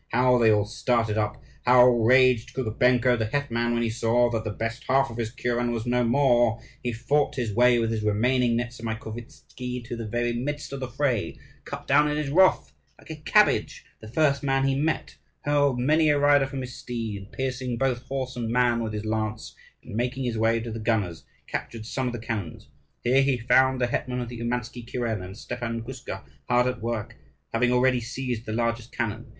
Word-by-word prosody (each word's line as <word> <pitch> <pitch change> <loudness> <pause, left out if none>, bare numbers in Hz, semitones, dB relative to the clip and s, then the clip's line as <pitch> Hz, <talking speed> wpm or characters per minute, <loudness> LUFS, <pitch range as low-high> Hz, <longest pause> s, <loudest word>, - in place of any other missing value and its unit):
How 125 +1 +3
they 115 -2 +5
all 105 -1 +3
started 115 0 0
up! 105 -1 -1 0.2
How 125 0 +7
raged 125 0 +4
Kukubenko, 125 0 +2
the 110 - 0
hetman, 120 -2 -1
when 120 - 0
he 115 - 0
saw 120 +1 +2
that 115 -2 -2
the 110 - -3
best 115 +3 -4
half 135 0 +3
of 115 - -8
his 115 -2 -2
kuren 120 0 -1
was 115 -1 -3
no 125 0 +1
more! 120 -2 +3 0.2
He 120 - -2
fought 130 +6 0
his 120 -5 -2
way 120 +2 +5
with 115 -1 0
his 110 -1 -1
remaining 120 +3 +2
Nezamaikovtzi 120 +1 -6
to 120 - -5
the 115 -1 -5
very 120 +2 -1
midst 145 +4 -4
of 140 - -4
the 130 - -4
fray, 120 - -1 0.3
cut - - -7
down 150 +2 +4
in 150 - -1
his 150 -2 -2
wrath, 185 +4 +4 0.2
like - - -12
a - - -5
cabbage, 150 - +2
the 110 - -11
first 140 +3 +2
man 135 -1 +1
he 135 - +2
met, 150 +4 -2 0.2
hurled 145 -3 +2
many 155 +5 +3
a 145 - +4
rider 145 -1 +4
from 135 0 -5
his 125 -1 -7
steed, 110 -5 -6
piercing 130 -2 -3
both 125 -1 0
horse 130 -1 -3
and 115 -2 -3
man 120 0 +2
with 110 -1 -3
his 105 0 -4
lance; 110 0 -3 0.3
and - - -10
making 125 +3 -1
his 120 -2 -2
way 115 +1 +2
to 115 0 -6
the 115 - -5
gunners, 105 -7 -1 0.2
captured 115 -2 -5
some 130 +2 -2
of 125 - -3
the - - -3
cannons. 110 -8 -5 0.3
Here 130 +3 +4
he 135 -2 +2
found 130 +2 +3
the 125 - +2
hetman 125 +1 -2
of 120 -1 -4
the 120 -1 -8
Oumansky 120 0 -3
kuren, 115 -3 -3
and 95 +3 -9
Stepan 120 -1 -4
Guska, 120 -6 -7 0.3
hard 125 0 +4
at 125 -2 -2
work, 115 -2 -4 0.4
having 125 +2 +2
already 125 0 +3
seized 120 -1 -4
the - - -3
largest 115 +1 -1
cannon. 115 -1 -4
120 Hz, 200 wpm, -26 LUFS, 115-130 Hz, 0.4 s, How